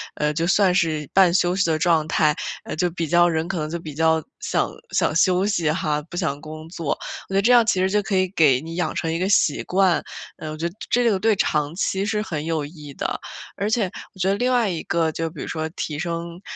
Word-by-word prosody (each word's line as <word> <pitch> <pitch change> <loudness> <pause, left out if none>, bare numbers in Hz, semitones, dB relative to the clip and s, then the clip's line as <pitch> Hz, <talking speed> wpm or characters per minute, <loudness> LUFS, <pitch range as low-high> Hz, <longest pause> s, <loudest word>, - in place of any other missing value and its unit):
呃， 150 0 0
就 165 +2 -1
算 195 0 +4
是 155 -5 0
半 185 -3 +5
休 175 -1 +2
息 190 -2 +1
的 160 - +2
状 160 -2 +2
态， 155 -1 +3 0.3
呃， - - -6
就 175 +2 +1
比 165 -1 -3
较 175 +2 +5
人 160 -1 0
可 175 -1 -3
能 155 0 -3
就 170 - -3
比 155 -3 -8
较 160 +1 +2 0.2
想 - - 0 0.2
想 - - +1
休 180 +4 +3
息 175 -6 +1
哈， 150 -2 0
不 - - -9
想 155 -6 -1
工 155 +1 -9
作。 165 -4 -3 0.4
我 - - -8
觉 - - 0
得 195 - +4
这 230 +5 +3
样 240 -2 +6
其 225 - +3
实 190 - +2
就 210 +2 +2
可 200 0 -2
以 185 0 +2
给 150 -9 +3
你 165 +2 -7
养 175 -3 -1
成 165 - -1
一 165 - -1
个 185 - 0
习 180 -7 +3
惯， 185 -2 +2 0.4
呃， 155 - -6
我 155 - -5
觉 160 +2 -4
得 - - -17 0.2
这 240 -1 +3
个 195 - 0
对 220 +1 +3
长 150 -4 0
期 195 +1 0
是 210 0 0
很 155 -8 -4
有 160 -3 -1
益 150 -2 -10
的。 - - -3 0.4
而 200 +2 -1
且 215 -5 +1 0.2
我 190 - -18
觉 190 +1 +1
得 195 - +2
另 245 +5 0
外 240 -4 +2
一 170 -3 -3
个 165 -2 0
就 165 +1 -3
比 155 -3 -9
如 - - -5
说 160 -1 -2
提 150 -2 -4
升 170 +1 -4
170 Hz, 275 characters per minute, -23 LUFS, 155-190 Hz, 0.4 s, 样